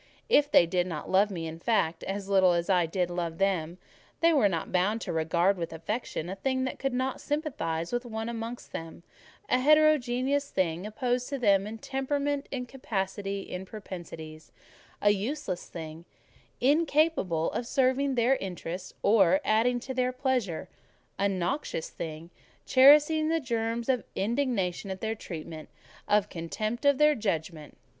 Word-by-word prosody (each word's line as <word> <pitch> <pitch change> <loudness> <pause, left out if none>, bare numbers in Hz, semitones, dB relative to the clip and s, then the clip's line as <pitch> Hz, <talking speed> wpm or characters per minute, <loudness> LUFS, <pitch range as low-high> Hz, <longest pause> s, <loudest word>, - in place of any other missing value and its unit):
If 290 -10 +4
they 175 - +6
did 180 +1 0
not 160 -4 -5
love 195 +2 +4
me, 170 -5 -5
in 160 0 -6
fact, 170 -6 +1
as 195 0 -4
little 190 -3 +4
did 170 +3 -2 0.4
I - - -4
love 170 -2 -3
them. 180 -4 0 0.4
They 335 0 +4
were 260 -9 +4
not 165 -4 -3
bound 190 +5 +1
to - - -4
regard 170 +4 +2
with 165 -1 -3
affection 165 +1 -4
a 190 - -4
thing 260 +6 -1
that 260 - -4
could 270 -2 -1
not 260 +1 -2
sympathise 210 - -2
with 240 +1 0
one 225 -2 -5
amongst 235 +1 -6
them; 165 +1 -7 0.4
a 250 - +2
heterogeneous 285 -2 +3
thing, 180 +1 -1
opposed 245 +2 -1
to 280 - -2
them 200 -5 +3
in 220 +1 -6
temperament, 280 +3 -2
in 250 -2 -4
capacity, 200 -5 -3
in 180 -1 -6
propensities; 170 -6 -9 0.5
a 205 - +6
useless 205 - -3
thing, 160 0 -8 0.5
incapable 290 - +2
of 235 - -3
serving 265 +1 +1
their 245 +3 +3
interest, 180 -1 -6
or 195 -3 +5
adding 235 +3 +2
to 260 - -5
their 255 0 +1
pleasure; 255 - -1 0.5
a 200 0 +2
noxious 185 - -2
thing, 160 +1 -7 0.3
cherishing 295 +4 +6
the 325 0 +2
germs 230 -3 -2
of 255 -4 +1
indignation 205 -5 -1
at 190 0 -4
their 220 +2 -2
treatment, 160 -6 -8 0.4
of 205 -1 +3
contempt 215 - -4
of 285 -1 +5
their 300 +1 +5
judgment. 165 - -3
210 Hz, 155 wpm, -28 LUFS, 175-260 Hz, 0.5 s, they